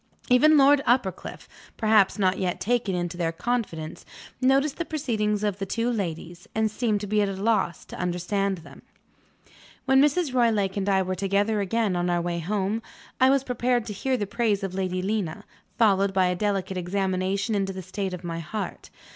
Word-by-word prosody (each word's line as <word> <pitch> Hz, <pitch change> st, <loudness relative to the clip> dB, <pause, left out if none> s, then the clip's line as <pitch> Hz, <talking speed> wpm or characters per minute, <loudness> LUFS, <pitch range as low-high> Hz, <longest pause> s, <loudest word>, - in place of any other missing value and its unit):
Even 305 Hz, +5 st, +6 dB
Lord 280 Hz, 0 st, +6 dB
Uppercliff 230 Hz, -7 st, -1 dB, 0.3 s
(perhaps 215 Hz, -3 st, +3 dB
not 190 Hz, -2 st, +1 dB
yet 180 Hz, -2 st, -1 dB
taken 225 Hz, -4 st, 0 dB
into 175 Hz, 0 st, -3 dB
their 165 Hz, -2 st, 0 dB
confidence) 165 Hz, -6 st, -3 dB, 0.4 s
noticed 275 Hz, +3 st, +2 dB
the 340 Hz, -, -1 dB
proceedings 220 Hz, -10 st, -1 dB
of 205 Hz, -2 st, -1 dB
the 195 Hz, -, -2 dB
two 230 Hz, +4 st, -1 dB
ladies, 175 Hz, -4 st, -5 dB
and 220 Hz, -1 st, +1 dB
seemed 215 Hz, -3 st, 0 dB
to -, -, -3 dB
be 210 Hz, +1 st, +1 dB
at 200 Hz, -, +1 dB
a -, -, -3 dB
loss 195 Hz, -3 st, 0 dB
to -, -, -10 dB
understand 185 Hz, +2 st, -1 dB
them. 165 Hz, -, -14 dB, 1.0 s
When 265 Hz, 0 st, +5 dB
Mrs. 295 Hz, 0 st, +2 dB
Roylake 220 Hz, -6 st, +2 dB
and 200 Hz, 0 st, -1 dB
I 190 Hz, -1 st, +3 dB
were 185 Hz, 0 st, -2 dB
together 200 Hz, +3 st, 0 dB
again, 205 Hz, 0 st, 0 dB
on 175 Hz, 0 st, 0 dB
our 175 Hz, 0 st, +1 dB
way 170 Hz, 0 st, -2 dB
home, 200 Hz, +5 st, -1 dB, 0.4 s
I 260 Hz, 0 st, +6 dB
was 275 Hz, -1 st, +3 dB
prepared 245 Hz, -2 st, 0 dB
to 210 Hz, -, -5 dB
hear 260 Hz, +6 st, -1 dB
the 205 Hz, -, -2 dB
praise 210 Hz, -1 st, 0 dB
of 195 Hz, -2 st, -3 dB
Lady 185 Hz, -1 st, -2 dB
Lena, 205 Hz, -2 st, -2 dB, 0.3 s
followed 200 Hz, -3 st, +3 dB
by 190 Hz, -1 st, +4 dB
a 180 Hz, 0 st, +1 dB
delicate 195 Hz, -1 st, -1 dB
examination 190 Hz, +3 st, -1 dB
into 195 Hz, -2 st, 0 dB
the 190 Hz, -1 st, -7 dB
state 190 Hz, 0 st, -4 dB
of 180 Hz, -, -11 dB
my 165 Hz, -1 st, -4 dB
heart. 205 Hz, +6 st, -6 dB
200 Hz, 190 wpm, -25 LUFS, 185-230 Hz, 1.0 s, Even